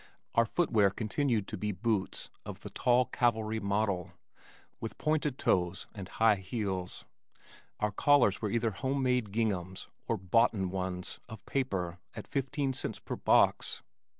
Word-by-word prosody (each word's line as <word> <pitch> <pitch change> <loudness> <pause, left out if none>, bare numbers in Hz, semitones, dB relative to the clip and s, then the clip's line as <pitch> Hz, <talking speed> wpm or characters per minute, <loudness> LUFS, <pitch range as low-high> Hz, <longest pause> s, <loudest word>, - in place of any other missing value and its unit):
Our 115 - +4
footwear 110 - +3
continued 110 +1 0
to - - -4
be 105 +2 -1
boots 105 0 -2
of - - -8
the - - -8
tall 125 +1 +3
cavalry 110 -2 +1
model 100 -3 -1 0.7
with 115 - -6
pointed 155 -3 0
toes 90 0 +1
and 100 -4 -7
high 110 -2 +4
heels. 95 -2 -4 0.7
Our 105 0 +1
collars 125 -3 +4
were 105 - 0
either 115 +1 +1
home 135 +7 -1
made 125 -5 +1
ginghams 100 -4 -2 0.2
or 115 - +1
"boughten" 95 0 +2
ones 90 -1 -3
of 110 -2 -10
paper 95 -10 -2 0.2
at - - -6
fifteen 135 0 -1
cents - - -3
per - - -5
box. - - +3
110 Hz, 145 wpm, -31 LUFS, 95-120 Hz, 0.7 s, Our